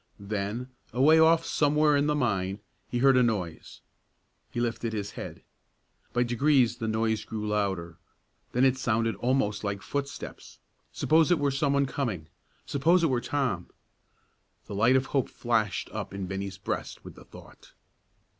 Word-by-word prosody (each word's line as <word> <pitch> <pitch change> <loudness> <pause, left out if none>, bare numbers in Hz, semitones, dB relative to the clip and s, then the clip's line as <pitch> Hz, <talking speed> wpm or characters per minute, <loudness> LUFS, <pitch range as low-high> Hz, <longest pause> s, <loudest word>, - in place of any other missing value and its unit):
Then, 105 +5 -4 0.2
away 150 +6 +5
off 160 +1 +5
somewhere 150 0 +3
in 145 +1 +2
the 150 - +2
mine, 100 -7 -1 0.3
he 120 - -2
heard 135 +2 +5
a 125 - +5
noise. 100 -9 -2 0.7
He - - -4
lifted 115 -1 -2
his 100 -2 -3
head. - - -8 0.7
By 120 - +2
degrees 120 0 +2
the 115 -2 -3
noise 110 -1 0
grew 105 -1 -5
louder; 95 -5 -2 0.5
then 125 +2 +3
it 130 -1 +3
sounded 115 -2 0
almost 120 -5 0
like 100 -1 -3
footsteps. 140 0 -6 0.3
Suppose 160 0 +3
it 175 - +4
were 145 -1 +1
some 140 +1 +1
one 140 0 +3
coming; 110 - -3 0.4
suppose 170 +6 +3
it 160 - +3
were 125 -2 +1
Tom! 130 -13 -2 1.0
The 100 - -8
light 115 +6 +4
of 130 0 +3
hope 135 -2 0
flashed 115 -4 -1
up - - -5
in 100 -1 -3
Bennie's 95 0 -5
breast 95 - -5
with - - -9
the - - -14
thought. - - -15
120 Hz, 160 wpm, -28 LUFS, 105-140 Hz, 1.0 s, away